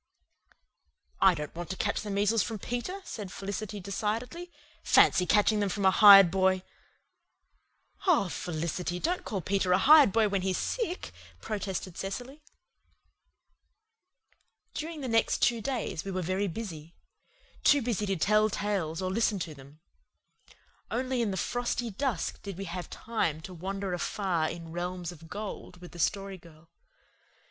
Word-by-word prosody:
"I 190 -2 +6
don't 150 -2 -6
want 175 0 -7
to 190 - -3
catch 205 - -1
the 210 - -6
measles 205 +2 +2
from 225 - -3
Peter," 245 - -4
said 205 -4 -7
Felicity 200 +1 -5
decidedly. 225 - -3 0.3
"Fancy 180 - +4
catching 210 0 +3
them 205 -1 +1
from 200 +1 -2
a 190 - +6
hired 195 -3 +9
boy!" 190 0 +2 1.4
"Oh, 310 - +4
Felicity, 175 +1 -3
don't 355 - -1
call 195 -3 -3
Peter 190 +1 0
a - - +5
hired 290 +2 +7
boy 220 0 +3
when 200 -2 -1
he's 185 -1 0
sick," 415 -7 -3 0.3
protested 195 -4 -4
Cecily. 245 +9 -6 2.3
During 315 0 -5
the 260 - -4
next 225 -1 +1
two 235 -2 +3
days 230 -9 -3
we 195 - -6
were 185 -1 -2
very 185 +4 -1
busy 170 -5 -7 0.7
too 285 -3 +5
busy 215 -3 -1
to 195 - 0
tell 215 +5 +3
tales 190 -5 -2
or 185 - -1
listen 220 0 +1
to 170 -4 -5
them. 140 +2 -16 1.1
Only 255 +2 -1
in 225 - 0
the 190 - -3
frosty 245 +2 -2
dusk 220 -4 -2
did 200 -3 -7
we 195 - -5
have 180 0 -6
time 215 -9 -2
to 185 +3 -9
wander 190 +2 -4
afar 175 -2 -1
in 165 -1 -8
realms 175 0 -4
of 165 -1 -13
gold 205 -3 -7
with 175 0 -12
the 175 - -11
Story 195 +2 -1
Girl. 165 0 -18
195 Hz, 155 wpm, -29 LUFS, 180-225 Hz, 2.3 s, hired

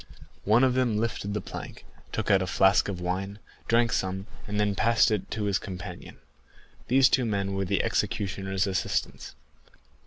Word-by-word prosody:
One 110 +5 +4
of 130 -1 +4
them 125 -4 +1
lifted 105 -2 -2
the 105 - -1
plank, - - -9 0.3
took - - -1
out 95 -1 +5
a 95 - -2
flask 95 +2 +4
of 95 -3 -4
wine, 95 +3 -3 0.3
drank 115 0 +3
some, 95 +1 -2 0.2
and 105 0 -2
then 105 -1 +2
passed 115 +2 +3
it 105 -3 -2
to 105 0 -3
his 100 -1 +1
companion. 90 -2 -8 0.7
These 130 +1 +5
two 130 - +2
men 100 -3 -1
were 95 0 -1
the 100 +2 0
executioner's 95 -1 -1
assistants. 95 -2 -2
100 Hz, 165 wpm, -27 LUFS, 95-110 Hz, 0.7 s, out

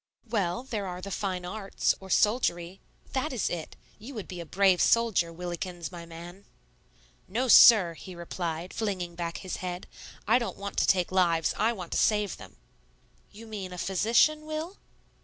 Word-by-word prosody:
"Well, 205 -2 -1
there 215 -7 -4
are 180 0 -5
the 200 +2 -7
fine 185 -3 -3
arts, 195 +2 -1
or 190 - -12
soldiery, 190 -5 +1 0.3
that 275 +4 -1
is 245 -5 -1
it. 165 -3 -5 0.2
You 245 +5 -10
would 215 - -6
be 180 - -7
a 170 - -7
brave 190 -1 +3
soldier, 225 -8 +3
Willikins, 175 -1 -5
my 170 -1 -9
man." 175 +4 -11 0.8
"No, 240 +7 -1
sir," 210 -7 +8
he 180 +2 -10
replied, 170 0 -5
flinging 185 -6 -3
back 170 -1 -4
his 185 -2 -5
head; 180 0 -5 0.4
"I - - +5
don't 235 - -4
want 200 0 -6
to - - +2
take 180 -2 +2
lives; 170 -3 +2
I 220 +3 +2
want 180 -6 -8
to - - +1
save 210 -3 +1
them." - - -13 0.8
"You 220 +2 -12
mean 205 -4 -6
a 180 - -7
physician, 235 - +2
Will?" 310 +5 -5
190 Hz, 175 wpm, -28 LUFS, 175-220 Hz, 0.8 s, sir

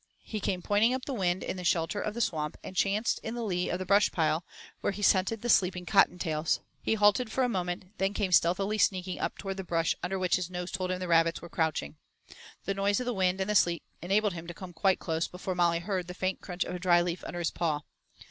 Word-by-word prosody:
He 215 - -4
came 185 -3 -2
pointing 220 +5 +3
up 260 - -5
the 280 - -3
wind 185 -5 0
in - - -3
the 180 - -6
shelter 170 +3 +1
of 215 - -3
the 235 - -2
Swamp 150 -7 -1
and 185 - -8
chanced 205 +5 +1
in 225 +2 -5
the 240 - -3
lee 180 -4 -1
of 180 - -1
the 185 - -5
brush 200 +2 +4
pile, 160 0 +1 0.4
where - - -1
he 205 +1 -6
scented 195 +3 +3
the - - -2
sleeping 180 -5 +3
Cotton 195 -2 +4
tails. 160 -3 0 0.2
He - - +1
halted 210 +2 +3
for 260 - +1
a - - +3
moment, 185 -2 -3
then 195 +1 0
came 200 -4 0
stealthily 195 +5 +3
sneaking 185 -2 +1
up - - -2
toward 195 -1 -5
the 190 - -4
brush 165 -2 +1
under 190 +2 -2
which 185 -2 +2
his 180 -1 -4
nose 180 0 -5
told 185 -1 -2
him 185 - 0
the 185 0 -4
rabbits 165 0 +3
were 170 - -8
crouching. 145 - -1 0.7
The 195 - 0
noise 200 +2 +1
of 250 - -3
the 245 - -1
wind 185 -2 +1
and 190 - -1
the - - +1
sleet 175 -4 +3 0.2
enabled 200 +3 +1
him 170 -1 -7
to 175 - -7
come 180 -1 -9
quite 190 +3 +2
close 160 -1 -2
before 185 +1 -5
Molly 170 -1 +2
heard 180 0 -3
the 180 - -7
faint 185 +1 -2
crunch 180 -1 -3
of - - -6
a 180 - -4
dry 175 -1 +4
leaf 175 0 -3
under 175 - -6
his 170 -2 -1
paw. 155 -4 -1
185 Hz, 255 wpm, -29 LUFS, 175-200 Hz, 0.7 s, brush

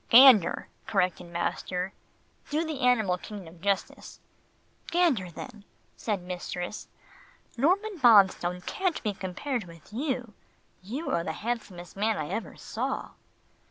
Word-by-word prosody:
"Gander," 245 -6 +8 0.2
corrected 185 -4 0
master. 180 +2 -2 0.6
"Do 310 +3 0
the 310 -4 -4
animal 220 -8 +3
kingdom 180 -6 -9
justice." 200 0 -2 0.7
"Gander 315 - +2
then," 215 +4 -9 0.3
said 205 -5 -2
mistress. 180 +1 -5 0.7
"Norman 370 - +1
Bonstone 190 -7 +5
can't 370 -4 -1
be 210 -3 0
compared 200 +6 -3
with 165 +3 -15
you. 250 -3 -2 0.5
You 255 - -4
are 170 - +1
the - - -3
handsomest 200 -7 -4
man 215 +2 +1
I 150 -1 -3
ever 225 - -4
saw." - - -3
210 Hz, 120 wpm, -28 LUFS, 180-260 Hz, 0.7 s, Gander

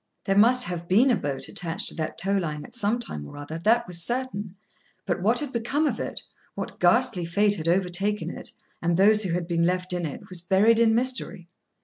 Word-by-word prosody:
There 195 - +1
must 245 +5 +5
have 175 -3 -5
been 230 +9 +4
a - - +4
boat 140 -8 -4
attached 170 -2 -3
to - - -6
that 155 -1 -4
tow 195 +3 0
line 155 -6 -3
at - - -15
some 230 -1 0
time 75 - -5
or - - -11
other, 150 +3 -7
that 230 +6 +2
was 175 -1 -1
certain; 210 -4 -2 0.5
but - - -2
what 225 +6 +3
had 290 -3 -5
become 245 +7 0
of - - -1
it, - - -4 0.3
what - - -6
ghastly 225 +1 +3
fate 200 +5 +2
had 165 -5 -4
overtaken 190 +4 0
it, - - -5 0.3
and 170 0 +1
those 210 +3 +5
who 190 -5 0
had 175 0 -1
been 170 -1 0
left 180 +1 0
in 175 -2 -2
it, 150 +7 -9
was 180 -2 +5
buried 200 +6 +3
in 225 -1 +4
mystery. 245 -8 -1
195 Hz, 220 wpm, -25 LUFS, 170-230 Hz, 0.5 s, must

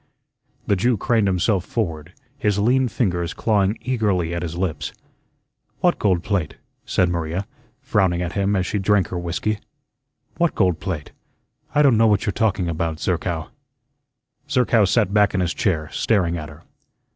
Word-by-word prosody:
The 100 - +2
Jew 120 +5 +1
craned 110 0 +1
himself 95 +1 +1
forward, 85 -6 -3 0.2
his 105 -8 0
lean 125 +5 +3
fingers 90 -7 -1
clawing 105 -1 +1
eagerly 100 -9 0
at 85 - -2
his 85 -1 -4
lips. 80 -5 -2 0.9
"What - - +2
gold 90 -4 +2
plate?" 100 -7 -1 0.3
said 90 - +2
Maria, 85 +2 -2 0.4
frowning 95 -4 +1
at 85 - -3
him 100 0 +1
as 95 -1 +1
she 105 - -1
drank 100 -1 +2
her 90 - -3
whiskey. 90 +5 -2 0.8
"What 170 -1 +1
gold 90 -5 +2
plate? 80 -6 -4 0.6
I 150 - +5
don' 130 -6 +5
know 115 0 +5
what 105 -1 +2
you're 105 - 0
talking 105 -5 0
about, 80 -1 -2
Zerkow." 85 -3 -2 1.0
Zerkow 120 -6 +3
sat 95 +1 +2
back 105 -1 +3
in - - +1
his 90 -2 0
chair, 80 -2 0
staring 90 -6 +1
at 75 -3 -6
her. 75 - -14
95 Hz, 160 wpm, -22 LUFS, 85-105 Hz, 1.0 s, I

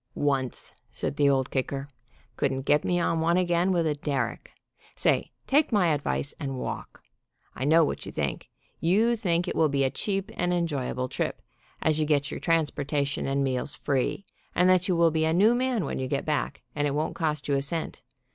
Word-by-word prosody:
"Once," 135 -4 -1 0.2
said - - -3
the 145 -1 +4
Old 135 -1 +1
Kicker. 135 +1 -2 0.5
Couldn't 135 -1 -1
get 150 +1 +3
me 175 0 +1
on 165 -1 +1
one 170 +2 +3
again 175 0 +2
with 170 -3 +2
a 155 - +2
derrick. 140 -5 -3 0.4
Say, - - +2
take 285 +1 +3
my 180 -7 +3
advice, 145 -1 -1
and 135 -4 -3
walk. - - -6 0.5
I 130 - -3
know 160 +2 +5
what - - -4
you - - -5
think. - - -3 0.3
You 215 +8 +3
think 175 -6 0
it - - -2
will 160 -1 +3
be 140 -1 +1
a 135 - +1
cheap 195 +1 -2
and 180 0 0
enjoyable 145 -7 -1
trip, - - -3 0.4
as 155 -1 +2
you 155 - +1
get 145 -2 +1
your - - -4
transportation 145 -4 0
and 140 0 +1
meals 130 +1 -1
free, 140 +8 -1 0.3
and 180 - +4
that 185 0 +3
you 185 - +2
will 170 -1 +4
be 160 0 +1
a 160 - +2
new 205 +7 +5
man 245 - 0
when - - -3
you 130 - -2
get 140 +1 -2
back, 150 -2 -2
and 145 0 +1
it 140 - -1
won't 155 +2 -1
cost 150 -3 -2
you 145 - +1
a 135 - +1
cent. 160 +4 -3
155 Hz, 205 wpm, -27 LUFS, 140-175 Hz, 0.5 s, know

